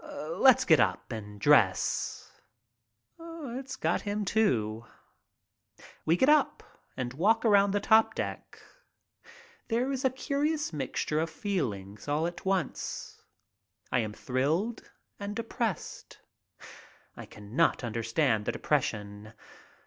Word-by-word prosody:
Let's 265 - +3
get 160 -3 +6
up 95 0 0
and 105 -2 -7
dress." 105 -8 +2 0.9
It's 275 -6 -7
got - - 0
him, 205 0 -2
too. 120 - +1 1.2
We 165 +2 +4
get 260 - +3
up 300 +1 +3 0.3
and 125 -2 -3
walk 215 - +2
around 200 -2 +5
the 205 +1 +1
top 220 +2 +4
deck. - - -5 1.1
There 245 +4 0
is 265 -1 -3
a 265 - +4
curious 290 - -1
mixture 150 +2 -2
of 165 +1 -1
feelings 115 - -4
all 150 +3 +1
at 175 +2 -5
once. 190 -3 -3 0.7
I 125 - +2
am 110 -2 -2
thrilled 155 - -1 0.3
and 205 0 -5
depressed. 230 - -4 1.0
I - - -9
cannot 115 +10 0
understand 115 0 0
the - - 0
depression. 105 +1 -2
165 Hz, 115 wpm, -29 LUFS, -, 1.2 s, get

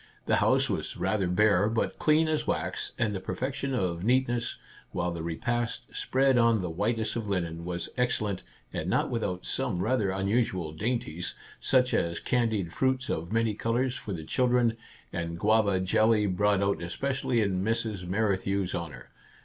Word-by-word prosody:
The - - +3
house - - +3
was - - -3
rather 100 -4 0
bare, 100 +2 +3
but 115 0 -1
clean 155 +1 +4
as 155 -1 0
wax - - -2
and 115 -3 +1
the 95 - -2
per - - -4
fection 135 +1 -2
of 90 -5 -1
neatness, 120 0 +1 0.3
while 90 0 -1
the 85 -1 -5
repast, 120 +8 -2
spread 135 -1 +3
on 115 -1 +4
the 90 -3 -3
whitest 110 +5 -1
of 115 -3 -3
linen, 85 -4 -2
was 85 -1 -3
excellent, 110 -6 0 0.3
and - - -2
not - - +1
without 90 -6 -2
some 90 - -1
rather 110 -3 +1
unusual 95 -3 0
dainties, 90 -2 -2
— - - -19
such 125 -1 +3
as 85 0 0
candied 110 -8 0
fruits 130 -1 +1
of 85 +2 -3
many 115 -1 +2
colours 120 +4 0
for 105 - -6
the 85 -4 -4
chil 125 +10 +1
dren, 120 -2 +3 0.4
and 85 -1 -3
guava 105 -1 +3
jelly 110 +3 +3
brought 100 +1 +2
out 100 -2 0
especially 130 +7 -1
in 95 -3 +1
Mrs. 110 -3 -1
Merrithew's 95 -1 0
honour. 85 -3 -6
105 Hz, 170 wpm, -28 LUFS, 90-120 Hz, 0.4 s, clean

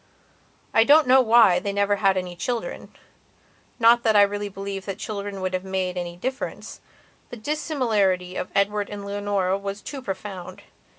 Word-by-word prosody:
I 225 - +6
don't 295 +5 +6
know 260 +1 +6
why 225 -6 +5
they 200 - -3
never 200 0 +1
had 195 -2 +2
any 180 -1 -4
childrennot 235 +6 -5 1.0
that 220 -2 +2
I 205 - +8
really 205 0 -2
believe 195 0 -6
that 195 -1 -4
children 200 -3 -5
would 185 0 -2
have 185 0 -2
made 190 -1 -2
any 175 -1 -5
difference. 260 +8 -5 0.5
The 245 - -8
dissimilarity 215 - 0
of - - -4
Edward 205 +1 +1
and 205 -1 -7
Leonora 200 -2 -1
was 200 +1 -6
too 280 -2 -7
profound. 190 -4 -7
200 Hz, 160 wpm, -24 LUFS, 190-220 Hz, 1.0 s, I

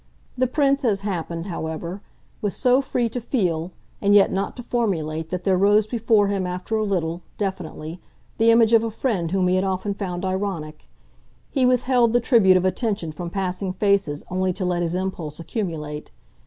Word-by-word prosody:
The 255 +1 +1
Prince, 275 +1 +2
as 205 -5 +1
happened, 170 -4 -3
however, 170 +1 -5 0.4
was 205 -2 -1
so 255 0 +3
free 250 -3 0
to 245 +2 -4
feel 180 - -1 0.3
and 205 0 +4
yet 200 - +6
not 195 +1 -2
to 245 - -8
formulate 160 -10 -1
that 180 +1 -3
there 190 -2 +3
rose 205 +2 +4
before 220 -2 +2
him 195 -2 -1
after 180 +5 -3
a 215 - +1
little, 175 -4 -1 0.2
definitely, 180 -4 -4 0.4
the 225 +1 +5
image 230 0 +5
of 225 -1 +6
a 230 - -1
friend 215 -7 -1
whom 185 0 +1
he 185 +1 +3
had 185 - +1
often 195 +1 -1
found 190 -2 -4
ironic. 185 -5 -3 0.6
He 260 -3 +3
withheld 250 -2 +3
the 245 - +5
tribute 220 -6 +5
of 185 - 0
attention 195 -4 -1
from 170 +3 -6
passing 185 0 -2
faces 195 -7 +1
only 185 0 0
to 185 - -3
let 175 -1 0
his 170 0 -1
impulse 180 -5 -4
accumulate. 160 -6 -4
190 Hz, 180 wpm, -23 LUFS, 175-220 Hz, 0.6 s, yet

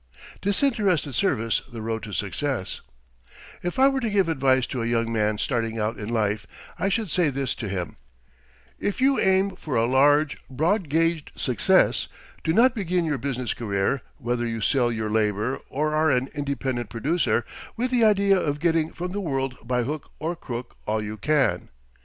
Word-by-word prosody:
DISINTERESTED 200 - +1
SERVICE 115 - +1
THE 115 -2 -6
ROAD 110 0 -2
TO 105 - -8
SUCCESS 105 +3 -2 0.8
If 175 - -3
I 265 +1 +6
were 270 -1 +1
to 235 -3 -1
give 195 -4 +2
advice 130 -4 +3
to 125 - -4
a 115 - -1
young 115 -1 0
man 105 -1 +1
starting 115 -1 -1
out 110 +1 -2
in 105 +1 -5
life, 110 -2 0 0.3
I 195 - +1
should 205 -3 -1
say 175 -4 +3
to 130 -5 -3
him: 90 -4 -4 0.8
If 205 - -2
you 270 +1 +3
aim 190 0 +2
for 155 -6 -5
a 115 - +3
large, 145 +4 +3
broad 165 - 0
gauged 165 0 +1
success, 125 -6 +2 0.4
do 160 - +1
not 235 +8 +5
begin 180 -6 0
your 150 -4 -1
business 130 -3 -2
career, 105 +3 -1 0.2
whether 120 -2 -1
you 115 -1 -3
sell 120 +2 +2
your 110 -2 -2
labour 105 +3 0
or 150 +3 -1
are 155 +1 +3
an 130 -1 +1
independent 135 -5 -2
producer, 135 0 0 0.3
with 250 +2 -1
the 245 -2 +3
idea 200 -2 +4
of 145 -3 -1
getting 160 -1 +1
from 180 +1 -4
the 205 +2 -3
world 135 -6 -2
by 125 0 0
hook 150 +4 -4
or 165 +3 -2
crook 125 -7 -7
all 110 0 0
you 105 +1 -5
can. 145 +6 +1
135 Hz, 175 wpm, -25 LUFS, 115-175 Hz, 0.8 s, I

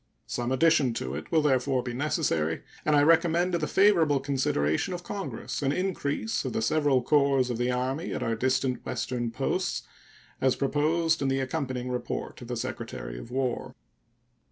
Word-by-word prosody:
Some 120 +1 -3
addition 135 -3 +3
to 65 - -3
it 75 +3 -6
will 160 -2 +3
therefore 130 -2 +2
be 120 - -4
necessary, 120 - 0 0.2
and 155 - +3
I 145 - +5
recommend 165 +3 +4
to 170 - +1
the 150 - -1
favorable 170 -8 +4
consideration 130 - 0
of 175 - -7
Congress 200 -5 -5
an 135 -1 +1
increase 140 - -1
of - - -3
the - - 0
several 140 0 +2
corps 140 -3 +3
of 120 - -3
the 125 +1 +1
Army 130 +7 -1
at - - -2
our 115 - 0
distant 130 +2 0
Western 120 -2 -2
posts, 115 - -1 0.6
as 130 -1 +3
proposed 160 +4 +1
in 135 - +1
the 135 0 +1
accompanying 130 -3 -3
report 125 - -4
of - - -8
the - - -3
Secretary - - -5
of 115 - -10
War. 130 -1 -2
135 Hz, 175 wpm, -28 LUFS, 125-155 Hz, 0.6 s, I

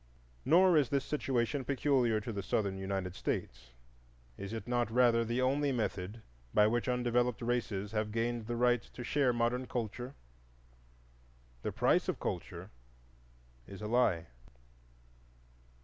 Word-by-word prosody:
Nor 175 +3 +6
is 140 -5 +3
this 140 -1 0
situation 135 -2 -1
peculiar 130 -4 +2
to 115 +1 -5
the 100 - -3
Southern 100 0 -1
United 95 -1 -3
States, 65 -8 -4 0.7
is 100 - -7
it 115 -1 -5
not 120 -2 +1
rather 115 0 +4
the 120 +3 -1
only 140 +2 +2
method 110 -3 -3 0.3
by 105 - +6
which 120 +4 +1
undeveloped 125 -1 +1
races 115 -4 -2
have 110 -1 -1
gained 115 0 -1
the 120 - -2
right 120 0 +3
to 125 - -10
share 135 +1 +2
modern 120 +2 0
culture? 120 +3 -4 1.5
The - - -2
price - - +2
of - - -2
culture - - -5 1.0
is 100 - -9
a 105 - -4
Lie. 105 -8 +2
120 Hz, 135 wpm, -33 LUFS, 105-125 Hz, 1.5 s, Nor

